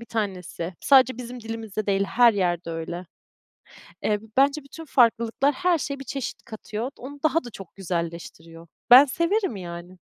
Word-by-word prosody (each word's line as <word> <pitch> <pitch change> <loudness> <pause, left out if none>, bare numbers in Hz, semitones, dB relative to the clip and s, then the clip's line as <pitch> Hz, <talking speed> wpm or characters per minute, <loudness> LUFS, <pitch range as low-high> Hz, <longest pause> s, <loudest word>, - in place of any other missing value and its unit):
bir 235 - -11
tanesi. 185 -5 -4
Sadece 260 -3 +5
bizim 245 0 -7
dilimizde 220 -2 -5
değil, 195 0 +1
her 235 +3 +4
yerde 175 -4 -1
öyle. 170 +2 -5 1.0
Eee, 210 -1 +1 0.2
bence 280 +2 +3
bütün 325 +4 -11
farklılıklar 240 +1 +2
her 360 -2 +1
şeye 280 -1 -4
bir - - -7
çeşit 270 0 -5
katıyor. 220 +2 -6
Onu 285 +3 -9
daha 315 0 +2
da 240 - -8
çok 195 -4 -12
güzelleştiriyor. 170 -2 -6 0.2
Ben 255 +3 +11
severim, 335 - 0
yani. 175 0 -9
225 Hz, 155 wpm, -24 LUFS, 180-270 Hz, 1.0 s, Ben